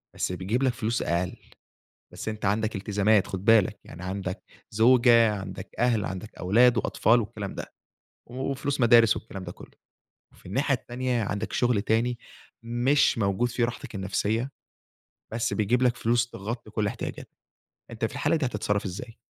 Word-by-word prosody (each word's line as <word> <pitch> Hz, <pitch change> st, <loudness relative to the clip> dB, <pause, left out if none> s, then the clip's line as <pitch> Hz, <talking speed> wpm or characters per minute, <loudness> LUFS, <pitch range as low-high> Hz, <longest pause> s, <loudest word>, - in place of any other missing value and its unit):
بس -, -, -1 dB
بيجيب 95 Hz, +8 st, -1 dB
لك 130 Hz, -3 st, +2 dB
فلوس 115 Hz, 0 st, -1 dB
أقل 85 Hz, +1 st, -1 dB, 0.8 s
بس -, -, -6 dB
أنت 110 Hz, -1 st, -5 dB
عندك 110 Hz, +2 st, 0 dB
التزامات 100 Hz, +1 st, +2 dB
خد 95 Hz, 0 st, -5 dB
بالك، 105 Hz, -3 st, +4 dB
يعني 85 Hz, -, -11 dB
عندك 95 Hz, +1 st, -4 dB, 0.3 s
زوجة، 115 Hz, 0 st, +5 dB
عندك 95 Hz, 0 st, -7 dB
أهل، 120 Hz, -4 st, +2 dB
عندك 95 Hz, +3 st, -6 dB
أولاد 120 Hz, +7 st, +4 dB
وأطفال 120 Hz, +1 st, +3 dB
والكلام 105 Hz, -2 st, -6 dB
ده -, -, -8 dB, 0.6 s
وفلوس 135 Hz, +2 st, -2 dB
مدارس 115 Hz, -1 st, +6 dB
والكلام 95 Hz, -4 st, -8 dB
ده 85 Hz, -, -6 dB
كلّه، -, -, -15 dB, 0.6 s
وفي -, -, -19 dB
الناحية 135 Hz, +8 st, +1 dB
التانية 125 Hz, -1 st, -2 dB
عندك 105 Hz, +2 st, -3 dB
شغل 120 Hz, -5 st, +2 dB
تاني 115 Hz, +2 st, +1 dB, 0.5 s
مش 120 Hz, +3 st, +2 dB
موجود 100 Hz, +4 st, +1 dB
فيه 120 Hz, 0 st, 0 dB
راحتك 120 Hz, 0 st, -5 dB
النفسيّة، 105 Hz, +6 st, -1 dB, 0.8 s
بس 115 Hz, -, -1 dB
بيجيب 115 Hz, +4 st, +1 dB
لك 125 Hz, -1 st, +3 dB
فلوس 120 Hz, +1 st, +1 dB
تغطي 110 Hz, +2 st, -6 dB
كل 105 Hz, -1 st, -1 dB
احتياجاتك، -, -, -5 dB, 0.6 s
أنت -, -, -2 dB
في -, -, -4 dB
الحالة -, -, +1 dB
دي 150 Hz, -4 st, 0 dB
هتتصرف 105 Hz, -3 st, -1 dB
إزاي؟ 110 Hz, +5 st, -7 dB
115 Hz, 155 wpm, -26 LUFS, 100-120 Hz, 0.8 s, مدارس